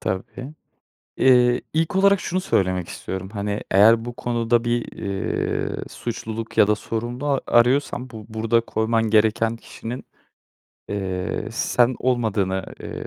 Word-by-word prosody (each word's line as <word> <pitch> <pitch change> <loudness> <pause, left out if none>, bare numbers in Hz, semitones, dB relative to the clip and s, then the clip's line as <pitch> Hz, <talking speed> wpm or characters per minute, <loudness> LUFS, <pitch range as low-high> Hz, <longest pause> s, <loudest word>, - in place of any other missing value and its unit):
Tabii, 125 +9 -4 0.7
ııı, 125 -2 +5
ilk 165 +3 0
olarak 200 0 +4
şunu 185 0 -1
söylemek 95 - 0
istiyorum, 95 0 -6
hani 100 -1 -2
eğer 110 +4 +6
bu 120 0 -6
konuda 120 0 0
bir, 120 0 -2
ııı, 100 -1 -2
suçluluk 115 -1 -5
ya - - +7
da 105 - +3
sorumlu 120 +5 -4
a 140 -2 +1
arıyorsan 125 +1 +2
bu 110 -2 -9
burada 115 +1 +1
koyman 115 -1 0
gereken 110 +1 +3
kişinin, 115 +2 -8 0.8
eee, 95 -2 -3
sen 125 +1 +2
olmadığını, 105 -7 0 0.2
eee, - - -6
115 Hz, 130 wpm, -23 LUFS, 105-125 Hz, 0.8 s, ya